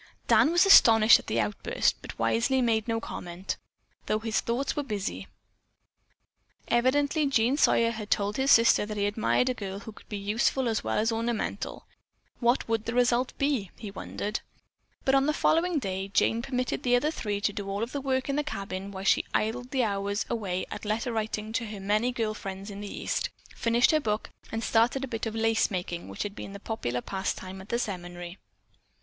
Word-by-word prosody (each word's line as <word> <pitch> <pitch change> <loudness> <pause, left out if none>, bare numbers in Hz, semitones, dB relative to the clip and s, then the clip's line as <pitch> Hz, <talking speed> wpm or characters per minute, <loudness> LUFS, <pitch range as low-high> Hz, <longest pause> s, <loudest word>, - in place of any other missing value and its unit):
Dan 305 - +5
was 350 +3 +5
astonished 225 - +8
at - - -13
the - - 0
outburst, - - 0
but - - -9
wisely 255 +3 +2
made 225 -3 +1
no 225 -1 0
comment, 180 -3 -5 0.5
though 215 - +2
his 220 0 -1
thoughts 245 +4 -1
were 295 - 0
busy. 210 -7 -4 1.4
Evidently 285 +5 +2
Jean 255 -1 +2
Sawyer 230 -5 +3
had 215 -2 -6
told 205 0 +1
his 265 +1 +1
sister 230 -4 +6
that 210 0 -5
he 200 - +1
admired 215 +4 +1
a 255 - +2
girl 200 -3 -6
who 220 - -8
could - - -18
be 210 - -3
useful 220 +6 +1
as 225 -2 0
well - - -1
as 225 +2 +2
ornamental. 230 0 -3 0.5
What 240 +1 +2
would 225 -1 -1
the 230 - -3
result 245 +1 +2
be, 275 -9 0
he 210 -3 -7
wondered. 205 +2 -4 0.7
But 270 - +3
on 270 +1 +4
the 305 - +2
following 330 +1 +2
day 195 -6 -2
Jane 225 +3 +2
permitted 250 +1 -2
the 245 -2 +3
other 295 +5 +2
three 210 -9 -3
to 205 0 0
do 200 -1 -5
all 200 +2 -2
of 235 - -4
the 285 - -3
work 260 -1 0
of 275 - -1
the 295 - +1
cabin 195 -6 -5
while 190 -1 -7
she 195 - +3
idled 245 +4 -1
hours 205 -4 0
away 190 -6 -2
at - - -6
letter 225 +3 -1
writing 215 0 -3
to 230 0 -1
her 210 -1 -7
many 210 +5 +1
girl 225 -3 -1
friends 195 0 -7
in 200 0 -7
the 205 - -6
East; - - -2 0.3
finished 235 +1 +3
her 310 - +3
book, 215 -6 -2 0.2
and 225 0 -3
started 235 +5 +2
a - - -2
bit 225 -1 -3
of 220 - -5
lace 225 0 +2
making 175 -3 -4
which 95 - -4
had 205 - -5
been 195 - -8
the 200 - -8
popular 125 - -3
pastime 190 +1 -4
at 195 - -14
the 235 - +1
seminary. 175 -4 -5
225 Hz, 200 wpm, -28 LUFS, 200-245 Hz, 1.4 s, astonished